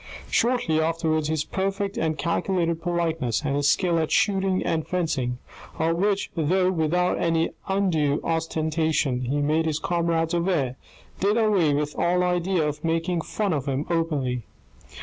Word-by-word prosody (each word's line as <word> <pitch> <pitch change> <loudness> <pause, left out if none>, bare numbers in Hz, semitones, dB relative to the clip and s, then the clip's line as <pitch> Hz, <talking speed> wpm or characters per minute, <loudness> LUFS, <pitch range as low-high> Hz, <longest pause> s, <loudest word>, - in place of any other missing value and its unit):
Shortly 235 -10 +2
afterwards 160 -1 0
his 155 -1 0
perfect 195 +2 -2
and 160 -1 -1
calculated 170 0 0
politeness, 165 -8 -1
and 140 -1 0
his 145 0 +2
skill 175 -1 +2
at 160 - -1
shooting 190 -2 +2
and 160 -1 -1
fencing, 145 -9 -1 0.4
of 165 +1 +1
which, 200 +2 0
though 180 +3 +2
without 175 +1 +1
any 165 -1 +1 0.2
undue 165 -7 +1
ostentation, 160 -4 0
he 145 +4 0
made 155 +3 +1
his 155 -2 0
comrades 165 -1 0
aware, 170 -8 0 0.4
did 205 +3 +2
away, 195 -10 +3
with 150 0 -2
all 180 +1 +2
idea 180 -2 +1
of 150 0 -5
making 165 +1 0
fun 200 +2 -2
of 145 -2 -2
him 135 +2 -1
openly. 145 -8 -1
165 Hz, 150 wpm, -25 LUFS, 155-180 Hz, 0.4 s, away